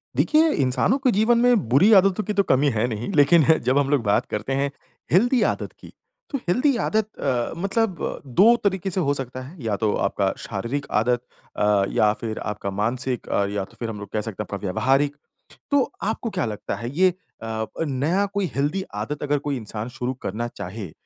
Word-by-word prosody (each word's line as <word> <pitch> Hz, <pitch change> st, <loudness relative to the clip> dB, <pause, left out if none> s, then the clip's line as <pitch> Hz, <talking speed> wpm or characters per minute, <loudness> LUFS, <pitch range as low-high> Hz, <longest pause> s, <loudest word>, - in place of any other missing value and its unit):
देखिए, 315 Hz, +1 st, +4 dB
इंसानों 135 Hz, -, +2 dB
के 265 Hz, -2 st, +2 dB
जीवन 220 Hz, +4 st, +3 dB
में 240 Hz, -, +3 dB
बुरी 155 Hz, -, +5 dB
आदतों 195 Hz, +1 st, +4 dB
की 210 Hz, -, -3 dB
तो 200 Hz, 0 st, +3 dB
कमी 145 Hz, -4 st, +3 dB
है 115 Hz, 0 st, 0 dB
नहीं, 115 Hz, -, -4 dB
लेकिन 155 Hz, +1 st, +5 dB, 0.2 s
जब 130 Hz, +2 st, +3 dB
हम 140 Hz, -1 st, +2 dB
लोग 140 Hz, -4 st, +2 dB
बात 105 Hz, -2 st, +2 dB
करते 105 Hz, +6 st, -2 dB
हैं, 140 Hz, +1 st, 0 dB, 0.4 s
हेल्दी 240 Hz, -, +4 dB
आदत -, -, -6 dB
की, -, -, -13 dB, 0.4 s
तो 280 Hz, -, -2 dB
हेल्दी 255 Hz, +10 st, +2 dB
आदत 220 Hz, -1 st, 0 dB
अ, 125 Hz, -4 st, 0 dB
मतलब 195 Hz, +1 st, -1 dB
अ, -, -, -3 dB
2 195 Hz, -, +5 dB
तरीके 195 Hz, -1 st, 0 dB
से 190 Hz, -, -2 dB
हो 140 Hz, -3 st, +1 dB
सकता 130 Hz, -2 st, -4 dB
है 140 Hz, +3 st, -11 dB
या 110 Hz, -3 st, 0 dB
तो 105 Hz, -, +2 dB
आपका 100 Hz, -1 st, 0 dB, 0.2 s
शारीरिक 120 Hz, +7 st, -3 dB, 0.2 s
आदत 120 Hz, +1 st, +1 dB, 0.4 s
अ, 105 Hz, -1 st, +3 dB
या 105 Hz, -, +3 dB
फिर 110 Hz, -2 st, -4 dB
आपका 105 Hz, -1 st, -4 dB
मानसिक 120 Hz, +5 st, -2 dB
अ, 100 Hz, -, +1 dB
या 100 Hz, -1 st, -2 dB
तो -, -, -21 dB
फिर 115 Hz, -, -3 dB
हम 105 Hz, -2 st, -6 dB
लोग 100 Hz, -1 st, -8 dB
कह 110 Hz, -, 0 dB
सकते 105 Hz, -1 st, -5 dB
हैं -, -, -14 dB
आपका 100 Hz, -, -4 dB
व्यावहारिक। 135 Hz, +9 st, +1 dB, 0.6 s
तो 285 Hz, -3 st, +2 dB
आपको 225 Hz, +2 st, -2 dB
क्या 190 Hz, -3 st, -1 dB
लगता 105 Hz, -2 st, -4 dB
है 115 Hz, +4 st, -5 dB
ये 185 Hz, 0 st, +5 dB, 0.3 s
अ -, -, -5 dB
अ, 110 Hz, 0 st, -3 dB, 0.2 s
नया 155 Hz, +7 st, 0 dB
कोई 200 Hz, -2 st, +1 dB
हेल्दी 145 Hz, +8 st, 0 dB, 0.2 s
आदत 150 Hz, +6 st, -5 dB
अगर 145 Hz, 0 st, +1 dB
कोई 140 Hz, -, 0 dB
इंसान 110 Hz, 0 st, -6 dB
शुरू 125 Hz, 0 st, -1 dB
करना 115 Hz, +5 st, -3 dB
चाहे, 95 Hz, -3 st, -7 dB
135 Hz, 210 wpm, -23 LUFS, -, 0.6 s, बुरी